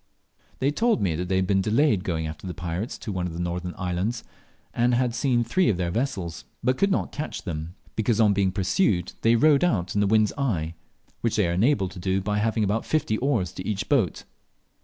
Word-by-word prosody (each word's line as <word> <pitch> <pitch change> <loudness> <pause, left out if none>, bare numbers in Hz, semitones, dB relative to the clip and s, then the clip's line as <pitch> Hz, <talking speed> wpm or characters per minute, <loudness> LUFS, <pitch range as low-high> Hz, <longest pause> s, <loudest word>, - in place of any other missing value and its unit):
They 135 +2 +1
told 230 - +2
me 95 -5 +1
that 90 +2 -3
they 95 - +1
had 95 0 +2
been 95 0 +2
delayed 110 0 +2
going 80 -5 -2
after 80 +4 -7
the 90 - -5
pirates 85 +7 -4
to 110 - -6
one 90 -2 -2
of 85 - -6
the 85 - -6
northern 90 0 -3
islands, 95 +6 -2 0.5
and 120 +1 +2
had 125 -1 +1
seen 120 0 +1
three 180 +11 +2
of 100 - +1
their 90 -1 -1
vessels 95 - -3 0.2
but 130 +1 +2
could 200 +8 +2
not 195 - 0
catch 155 +2 -5
them, 80 -1 -5 0.2
because 110 0 +1
on 105 -2 +5
being 100 -1 +1
pursued 95 - +1
they 115 +1 +4
rowed 145 +4 +4
out 95 - +1
in 105 - +1
the 100 - +3
wind's 110 0 +3
eye, 85 - -1 0.5
which 115 - 0
they 105 -4 +2
are 85 - 0
enabled 100 -1 +2
to 95 - -9
do 95 +1 0
by 105 +2 -1
having 110 +1 +1
about 105 +3 0
fifty 130 -8 0
oars 115 - 0
to 95 - -7
each 105 -3 -2
boat. 115 - +1
105 Hz, 220 wpm, -25 LUFS, 90-120 Hz, 0.5 s, on